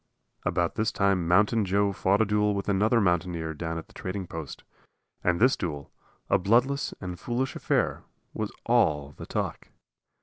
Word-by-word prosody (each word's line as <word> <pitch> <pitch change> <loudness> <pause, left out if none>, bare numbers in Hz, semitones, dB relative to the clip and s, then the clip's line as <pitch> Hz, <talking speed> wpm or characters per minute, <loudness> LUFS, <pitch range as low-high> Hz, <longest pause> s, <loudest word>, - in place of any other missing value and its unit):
About 85 -1 0
this 110 +1 0
time 100 -6 +1
Mountain 105 +5 +4
Joe 100 +2 +2
fought 100 +2 +2
a - - +4
duel 105 0 +1
with 100 - -3
another 105 +4 +3
mountaineer 85 -4 0
down 80 +1 -4
at 80 - -6
the - - -22
trading 95 0 -4
post, 80 -4 -7 0.6
and 90 -1 +2
this 125 +4 +5
duel, 75 -6 -5 0.4
a 100 - +3
bloodless 120 +9 +2
and 90 -1 -6
foolish 125 +4 -2
affair, - - 0 0.3
was - - -3
all 75 -2 +2
the - - -10
talk. - - -3
95 Hz, 165 wpm, -27 LUFS, 85-105 Hz, 0.6 s, this